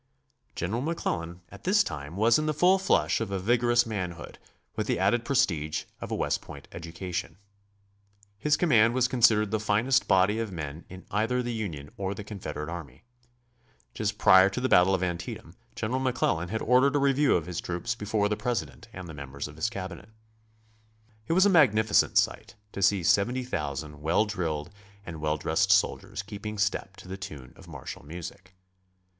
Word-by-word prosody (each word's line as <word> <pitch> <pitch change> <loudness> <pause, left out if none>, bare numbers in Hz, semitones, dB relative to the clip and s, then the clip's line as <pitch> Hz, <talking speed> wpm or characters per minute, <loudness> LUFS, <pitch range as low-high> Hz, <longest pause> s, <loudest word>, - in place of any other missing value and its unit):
General 105 +8 -2
McClellan 90 - -3
at - - -13
this 205 +4 +4
time 75 0 -6
was 115 +6 +4
in 155 - -1
the 155 - 0
full 185 +5 +4
flush 190 - +2
of 110 - -2
a 100 - -2
vigorous 120 +4 +2
manhood, 90 -7 -5 0.4
with - - -2
the - - +1
added 110 +5 +2
prestige 80 - 0 0.2
of - - -6
a - - -2
West - - -1
Point - - -11
education. 85 +2 -5 1.0
His 150 -1 +2
command 120 -9 +4
was 130 -1 +3
considered 115 -5 +3
the 110 - 0
finest 110 +5 +2
body 95 +3 +3
of 115 -3 -3
men 80 -2 -6
in 95 0 -11
either 115 +5 0
the 120 0 -3
Union 85 -11 -5
or 100 0 -3
the 105 - -7
Confederate 85 -8 -6
army. 80 -7 -8 0.9
Just 105 -1 -2
prior 95 -1 +7
to 100 - -4
the 130 - 0
battle 95 -4 +5
of 95 - -2
Antietam 85 -1 -5 0.2
General 120 +4 -2
McClellan 105 -10 0
had 110 +2 -3
ordered 130 +4 +4
a - - +3
review 140 0 +3
of 85 - 0
his 90 -1 -4
troops 90 +7 -3
before 105 -2 0
the 105 - 0
President 105 - -4
and 95 -1 -8
the 80 - -8
members 70 0 -6
of 75 - -12
his 80 +8 -1
Cabinet. 95 -2 -7 1.2
It - - +1
was 185 +3 +5
a - - +5
magnificent 110 - +4
sight - - 0 0.2
to 100 - -6
see 95 -1 +3
70,000 85 - -1
well 80 +8 +2
drilled 85 -6 -3 0.3
and 80 -3 -7
well 75 0 0
dressed - - +1
soldiers - - +1
keeping 105 +1 -7
step 100 -1 -1
to - - -13
the 95 +1 -6
tune 75 -9 -9
of - - -16
martial - - -8
music. 90 +4 -9
100 Hz, 180 wpm, -27 LUFS, 85-115 Hz, 1.2 s, prior